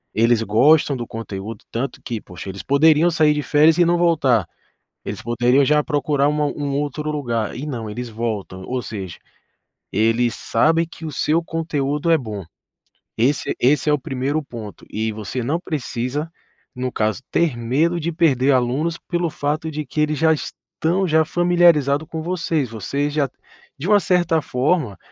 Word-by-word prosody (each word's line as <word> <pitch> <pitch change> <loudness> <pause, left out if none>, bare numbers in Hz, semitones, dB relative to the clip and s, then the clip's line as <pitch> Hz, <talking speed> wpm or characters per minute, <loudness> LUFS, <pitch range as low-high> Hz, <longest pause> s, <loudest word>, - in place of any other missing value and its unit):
eles 115 +1 +3
gostam 135 +7 +4
do 120 - -4
conteúdo 110 -1 -7
tanto 130 +4 -3
que, 115 -2 -4
poxa, 90 0 -9
eles 95 +1 -7
poderiam 155 +4 +4
sair 155 -2 +3
de 150 - -2
férias 155 +2 +4
e 175 - +5
não 175 +1 +3
voltar. 135 - +3 0.6
Eles 100 -1 -5
poderiam 120 +4 +3
já 150 +2 +3
procurar 145 -2 +1
uma 150 0 +1
um 145 -1 -3
outro 150 +1 -2
lugar 120 -8 -2
e 140 - -5
não 120 -7 -4
eles 120 +3 -5
voltam. 110 -5 -4
Ou 125 0 -2
seja, 100 -5 -7 0.7
eles 115 +3 +2
sabem 160 +7 +2
que 160 - -10
o 155 - -4
seu 155 +4 +1
conteúdo 150 -2 -2
é 165 - +6
bom. 105 -7 -6 0.7
Esse 130 +4 +1
esse 145 +3 +3
é - - +4
o 145 - +1
primeiro 135 +4 -2
ponto. 115 -6 -9
E 110 +1 -2
você 110 +3 -4
não 155 +7 0
precisa 145 -1 -3 0.4
no 125 0 -3
caso 110 +1 -1
ter 165 -7 +2
medo 145 +9 0
de 170 +2 -2
perder 140 -5 +3
alunos 135 +7 0
pelo 175 -1 -2
fato 150 +2 -2
de 155 -1 -4
que 150 +3 -2
eles 150 -1 +1
já 160 0 +4
estão 170 +4 -2
já 160 -1 +4
familiarizado 170 -4 +3
com 160 +1 -5
vocês. 165 -5 -1
Vocês 140 +7 -2
já 145 -2 +1 0.5
de 150 +6 -5
uma 205 -1 +5
certa 175 -4 +2
forma, 130 - 0
145 Hz, 170 wpm, -21 LUFS, 120-160 Hz, 0.7 s, é